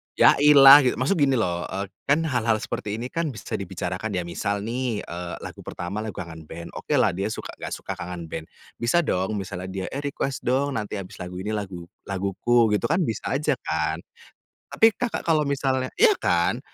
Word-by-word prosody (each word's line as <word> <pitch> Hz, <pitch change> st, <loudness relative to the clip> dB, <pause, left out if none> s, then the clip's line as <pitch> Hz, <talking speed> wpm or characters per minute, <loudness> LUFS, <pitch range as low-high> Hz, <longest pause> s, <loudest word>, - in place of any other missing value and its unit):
"Ya -, -, +6 dB
ilah" 140 Hz, -1 st, +10 dB
gitu. 125 Hz, -, +2 dB
Maksud 135 Hz, +10 st, +2 dB
gini 135 Hz, -2 st, +4 dB
loh, 90 Hz, -7 st, -1 dB
eee, 100 Hz, +1 st, -4 dB, 0.2 s
kan 145 Hz, +4 st, +3 dB
hal-hal 120 Hz, -7 st, +1 dB
seperti 105 Hz, 0 st, -3 dB
ini 120 Hz, +3 st, -4 dB
kan 165 Hz, -1 st, -1 dB
bisa 110 Hz, -9 st, -5 dB
dibicarakan, 95 Hz, +2 st, -4 dB
ya 90 Hz, -, 0 dB
misal 100 Hz, +4 st, -2 dB
nih, 120 Hz, -1 st, -2 dB
eee, 85 Hz, 0 st, -6 dB
lagu -, -, -8 dB
pertama 90 Hz, +4 st, -4 dB
lagu 110 Hz, -3 st, -5 dB
Kangen 80 Hz, -2 st, -8 dB
Band, 85 Hz, +2 st, -8 dB
oke -, -, -2 dB
lah -, -, +4 dB
dia 95 Hz, +3 st, -2 dB
suka 110 Hz, -, -5 dB
enggak -, -, -4 dB
suka -, -, -7 dB
Kangen 90 Hz, -1 st, -5 dB
Band, 80 Hz, 0 st, -5 dB, 0.3 s
bisa 120 Hz, +9 st, +2 dB
dong 95 Hz, -, -1 dB
misalnya 95 Hz, -2 st, -5 dB
dia, 95 Hz, 0 st, -4 dB
"Eh 140 Hz, -, -3 dB
request 140 Hz, -1 st, -2 dB
dong, 130 Hz, 0 st, +1 dB
nanti 105 Hz, 0 st, -5 dB
habis 95 Hz, -2 st, -7 dB
lagu 90 Hz, 0 st, -6 dB
ini 105 Hz, -, -3 dB
lagu 95 Hz, -5 st, -5 dB, 0.2 s
laguku," 100 Hz, +4 st, +2 dB
gitu 105 Hz, -, +1 dB
kan, 170 Hz, +4 st, +2 dB
bisa 115 Hz, -1 st, -2 dB
aja 150 Hz, 0 st, +1 dB
kan. 80 Hz, 0 st, 0 dB, 0.7 s
Tapi 225 Hz, 0 st, +5 dB
Kakak 245 Hz, +2 st, -3 dB
kalau 155 Hz, -3 st, +2 dB
misalnya 135 Hz, -2 st, 0 dB
iya 455 Hz, -1 st, +6 dB
kan, -, -, +1 dB
110 Hz, 195 wpm, -24 LUFS, 90-135 Hz, 0.7 s, ilah